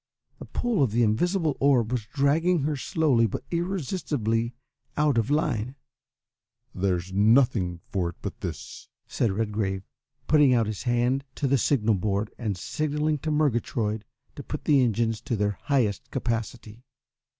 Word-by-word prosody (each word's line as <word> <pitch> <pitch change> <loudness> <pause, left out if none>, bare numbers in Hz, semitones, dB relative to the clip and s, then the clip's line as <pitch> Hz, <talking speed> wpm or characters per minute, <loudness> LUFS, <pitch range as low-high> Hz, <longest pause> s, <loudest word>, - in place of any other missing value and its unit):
The - - -8
pull 240 -9 -1
of 135 - +3
the 120 +2 +2
invisible 155 - +1
orb 125 -5 +3
was 120 -4 -2
dragging 150 +6 +2
her 150 +1 0
slowly 140 - +2
but 110 - -5
irresistibly 145 - -1 0.4
out 150 -5 +3
of 115 - 0
her 145 - +2
line. 125 -4 -1 1.0
"There's 95 -1 -1
nothing 105 -4 +3
for 90 -3 0
it 85 - -10
but - - -6
this," - - -7 0.2
said 115 - 0
Redgrave, 100 -2 -2 0.4
putting 145 -4 +5
out 115 -2 +3
his 105 -2 -4
hand 125 +2 +1
to - - -2
the 135 0 +3
signal 115 -4 +2
board, 100 +2 -1
and 105 -6 -2
signalling 150 +6 -1
to 155 - -3
Murgatroyd 120 -7 0 0.3
to - - -7
put - - -6
the 140 -3 +5
engines 115 -1 0
to 125 -2 -2
their 105 -1 -1
highest 120 -8 0
capacity. 115 0 -4
120 Hz, 150 wpm, -26 LUFS, 105-145 Hz, 1.0 s, putting